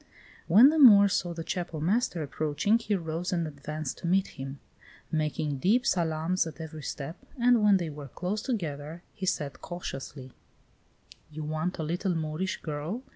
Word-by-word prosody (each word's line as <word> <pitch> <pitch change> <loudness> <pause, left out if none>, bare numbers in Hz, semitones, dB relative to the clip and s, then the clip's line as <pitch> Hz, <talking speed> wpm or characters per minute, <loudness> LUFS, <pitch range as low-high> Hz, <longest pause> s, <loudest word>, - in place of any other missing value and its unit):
When 220 - +8
the 315 +1 +1
Moor 205 -7 +9
saw 175 -2 -1
the 165 -1 -5
Chapel 170 -2 -4
master 180 0 0
approaching, 155 +9 +1
he 210 -2 -1
rose 165 0 -3
and 170 -3 0
advanced 150 0 -5
to - - -4
meet 190 +2 +2
him, 135 +1 -8 0.5
making 150 -2 -1
deep 225 - +3
salaams 165 +1 +1
at 160 - -9
every 160 -1 -7
step, 145 +3 -6 0.2
and 240 -1 +5
when 205 -2 +5
they 170 -4 -3
were 145 -1 -8
close 180 - -3
together, 165 - -4
he 190 - -5
said 145 -7 -2
cautiously: 135 -6 -7 1.0
"You 155 0 -6
want 155 +4 -2
a 160 - -3
little 175 +3 -1
Moorish 160 +4 -3
girl? 155 - -4
165 Hz, 165 wpm, -28 LUFS, 155-190 Hz, 1.0 s, Moor